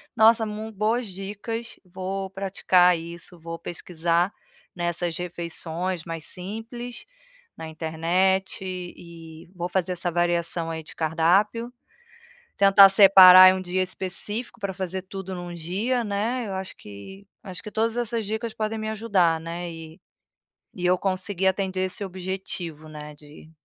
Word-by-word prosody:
Nossa, 225 +1 +5
m 215 +1 -6
boas 220 +3 0
dicas, 205 +4 -6
vou 190 +1 -5
praticar 185 -2 +3
isso, 170 +1 -8
vou 165 +1 -7
pesquisar 170 +2 -1 0.4
nessas 175 -1 -2
refeições 175 0 -4
mais 165 -2 -6
simples 225 +6 -7 0.5
na 160 - -7
internet 170 +4 0
e 170 -3 -9
vou 175 0 -3
fazer 185 0 -1
essa 175 0 -3
variação 170 -1 0
aí 160 -1 -5
de - - -12
cardápio. 190 +9 +1 0.9
Tentar 195 0 +8
separar 185 -1 +9
um 185 - -4
dia 185 +1 -1
específico 205 +6 -4
pra 200 -1 -2
fazer 190 -1 -4
tudo 190 0 -7
num 175 -1 -7
dia, 200 +9 -1
né. 220 +5 -1
Eu 195 - -5
acho 190 0 -6
que 190 - -12 0.2
acho 190 +1 -7
que 215 - -8
todas 225 +1 0
essas 235 -2 -1
dicas 220 +2 -3
podem 220 0 -2
me 215 0 -4
ajudar, 195 -7 +1
né, 170 +2 -5
e 160 0 -11 0.7
e 180 -1 -2
eu 180 +1 +4
conseguir 190 0 -1
atender 190 0 -1
esse 185 - -6
objetivo, 180 -4 -5
né, 150 -1 -9
de 150 +1 -15
185 Hz, 140 wpm, -25 LUFS, 170-200 Hz, 0.9 s, separar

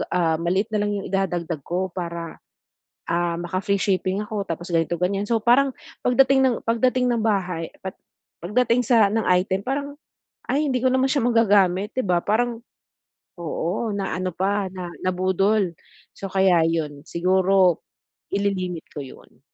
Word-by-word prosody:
ah, 165 -3 +2
maliit 190 +6 0
na 210 - +1
lang 205 - 0
yung 200 - -4
idadagdag 175 -4 -1
ko 185 +2 -2
para, 170 -2 -5 0.7
ah, 170 0 0
maka 175 +2 -3
free 200 +1 +1
shipping 190 +1 0
ako 210 -1 -3
tapos 170 +2 -5
ganito 165 0 +1
ganyan. 195 +3 0
So, 230 - +3
parang 260 +3 +4 0.3
pagdating 265 +2 +4
ng 255 -3 +3
pagdating 250 +2 +2
ng 235 -2 0
bahay 185 -6 0 0.2
at 190 -1 -5 0.5
pagdating 235 +5 +2
sa 225 -3 +5
ng 225 +1 +1
item 185 +1 +2
parang, 280 +2 -2 0.5
"Ay 295 +2 +1
hindi 255 -2 0
ko 255 - +5
naman 260 0 +3
siya 280 -2 +1
magagamit." 205 -4 +3
Di 255 - +1
ba? 180 -3 +2
Parang 230 +2 0 0.8
oo, 175 +6 -2
na 195 -1 -2
ano 185 0 -2
pa 200 +2 0
na 180 -2 -6
nabudol, 185 +1 +1 0.4
so, - - -7
kaya 190 -4 +4
yon 150 -3 -2
siguro 185 0 +3 0.5
ili-limit 185 -4 -1
ko 145 - -6
yon. 130 -2 -15
195 Hz, 155 wpm, -23 LUFS, 175-225 Hz, 0.8 s, sa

